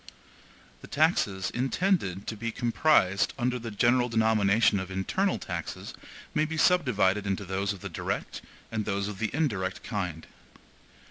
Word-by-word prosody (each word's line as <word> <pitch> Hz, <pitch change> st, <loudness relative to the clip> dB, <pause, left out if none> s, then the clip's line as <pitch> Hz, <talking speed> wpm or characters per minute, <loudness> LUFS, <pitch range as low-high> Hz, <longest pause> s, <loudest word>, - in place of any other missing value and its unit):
The -, -, -11 dB
taxes 105 Hz, -, +1 dB
intended 130 Hz, -, 0 dB
to 110 Hz, -, -4 dB
be 115 Hz, +2 st, -3 dB
comprised 115 Hz, -6 st, +2 dB
under 125 Hz, -1 st, 0 dB
the 115 Hz, 0 st, -6 dB
general 120 Hz, +3 st, +2 dB
denomination 110 Hz, -2 st, +3 dB
of 95 Hz, -1 st, -5 dB
internal 95 Hz, -, 0 dB
taxes 85 Hz, -2 st, -6 dB, 0.4 s
may 150 Hz, -, +2 dB
be 160 Hz, +1 st, -4 dB
subdivided 105 Hz, -, +3 dB
into 100 Hz, +1 st, -2 dB
those 95 Hz, +2 st, -1 dB
of 100 Hz, -3 st, -7 dB
the -, -, -5 dB
DIRECT -, -, -4 dB, 0.3 s
and 110 Hz, -2 st, -2 dB
those 100 Hz, 0 st, -1 dB
of 105 Hz, -2 st, -6 dB
the 115 Hz, -, +1 dB
INDIRECT 110 Hz, -12 st, -1 dB
kind. 90 Hz, -8 st, -4 dB
110 Hz, 145 wpm, -28 LUFS, 95-125 Hz, 0.4 s, denomination